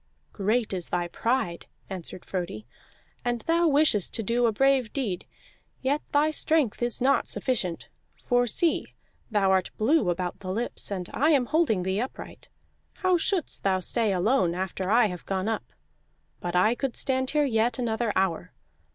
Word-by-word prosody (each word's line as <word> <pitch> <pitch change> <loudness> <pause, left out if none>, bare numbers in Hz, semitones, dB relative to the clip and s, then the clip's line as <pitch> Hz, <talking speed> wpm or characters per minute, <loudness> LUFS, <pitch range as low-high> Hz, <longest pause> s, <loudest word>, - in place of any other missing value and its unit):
"Great 215 +2 0
is 180 -3 -3
thy 175 -1 -1
pride," 225 -3 -1 0.2
answered 185 -1 -7
Frodi, 175 - -4 0.6
"and 240 -1 -1
thou 335 +1 +2
wishest 285 - +3
to 225 - -1
do 235 +3 +2
a - - +2
brave 265 0 +2
deed, 215 -11 -3 0.6
yet 285 +3 +1
thy 295 +2 +3
strength 310 -7 +1
is 240 0 +1
not 275 +2 +3
sufficient. 190 -10 -2 0.4
For 245 0 +2
see, 330 +9 0 0.3
thou 200 -4 +2
art 190 -1 +2
blue 225 - +3
about 175 0 -2
the 185 -1 -5
lips, 230 +5 -3
and 185 -3 -4
I 295 +5 +2
am 280 -6 +4
holding 285 - +1
thee 190 +2 -1
upright. 255 - -8 0.4
How 370 -2 +1
shouldst 360 -2 -1
thou 190 -1 +2
stay 220 +3 +1
alone 185 -1 +2
after 185 0 -3
I 230 +2 +5
have 180 -4 -5
gone 190 +1 -1
up? 225 -1 -3 0.7
But 175 0 -4
I 215 +6 +4
could 260 0 -3
stand 260 -1 0
here 300 -1 +2
yet 230 -2 +1
another 235 -2 -1
hour. 180 -1 0
225 Hz, 165 wpm, -26 LUFS, 190-265 Hz, 0.7 s, I